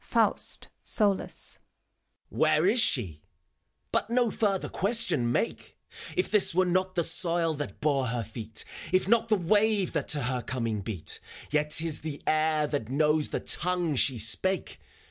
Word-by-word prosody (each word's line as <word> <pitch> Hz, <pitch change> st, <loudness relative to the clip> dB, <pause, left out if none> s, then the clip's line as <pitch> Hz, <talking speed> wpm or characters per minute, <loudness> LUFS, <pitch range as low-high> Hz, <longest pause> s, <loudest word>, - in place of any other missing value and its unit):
FAUST -, -, -1 dB
{solus), 205 Hz, -3 st, 0 dB, 0.7 s
,^ -, -, -11 dB
^, -, -, -7 dB
Where 155 Hz, +1 st, +3 dB
is 215 Hz, +6 st, +4 dB
shef 95 Hz, -, +2 dB, 0.4 s
— -, -, -49 dB
^But -, -, 0 dB
no 240 Hz, -1 st, +2 dB
further 200 Hz, -4 st, 0 dB
question 200 Hz, -, 0 dB
make! 230 Hz, -, -2 dB, 0.4 s
If 370 Hz, -, 0 dB
this 205 Hz, -5 st, +3 dB
were 185 Hz, +1 st, +4 dB
not 185 Hz, +1 st, 0 dB
the 170 Hz, -, +1 dB
soil 165 Hz, 0 st, +3 dB
that 135 Hz, -9 st, -6 dB
bore 140 Hz, -4 st, +1 dB
her 120 Hz, 0 st, -2 dB
feet, 110 Hz, +1 st, -5 dB, 0.3 s
If 185 Hz, 0 st, +2 dB
not 230 Hz, +1 st, +3 dB
the 220 Hz, -, +3 dB
wave 205 Hz, +1 st, +2 dB
that -, -, -2 dB
to 145 Hz, -3 st, +1 dB
her 125 Hz, 0 st, -1 dB
coming 115 Hz, -5 st, -3 dB
beat, 95 Hz, -4 st, -3 dB, 0.3 s
Tet 150 Hz, 0 st, +1 dB
't 160 Hz, -, +2 dB
is 155 Hz, -3 st, -2 dB
the 150 Hz, -2 st, -6 dB
air 155 Hz, -1 st, +2 dB
that 145 Hz, -7 st, -3 dB
knows 150 Hz, +2 st, +2 dB
the -, -, -3 dB
tongue 175 Hz, -3 st, 0 dB
she 130 Hz, 0 st, +2 dB
spake. 180 Hz, -, 0 dB
155 Hz, 170 wpm, -28 LUFS, 130-190 Hz, 0.7 s, is